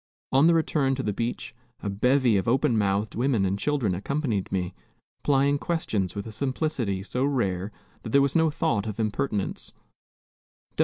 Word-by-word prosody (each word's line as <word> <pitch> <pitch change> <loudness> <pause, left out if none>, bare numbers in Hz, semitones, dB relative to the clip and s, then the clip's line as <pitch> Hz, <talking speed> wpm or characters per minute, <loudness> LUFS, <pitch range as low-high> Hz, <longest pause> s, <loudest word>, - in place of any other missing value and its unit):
On 135 +4 +5
the 170 - +5
return 145 -4 +1
to 130 - -3
the 105 - -1
beach 115 +4 -3 0.3
a - - -2
bevy 125 +4 +3
of 95 - 0
open 125 0 +2
mouthed 100 0 +1
women 120 -4 +1
and 95 +1 -1
children 135 -9 0
accompanied 110 - -2
me, 90 -2 -1 0.5
plying 140 0 +2
questions 110 - -1
with 100 - -4
a 110 - -7
simplicity 125 -5 -2
so 125 +5 -2
rare 100 -8 0 0.3
that - - -7
there 140 - +5
was 140 - 0
no 160 -1 +4
thought 115 -9 0
of 105 0 -5
impertinence. 105 -1 -2
115 Hz, 165 wpm, -26 LUFS, 100-140 Hz, 0.5 s, On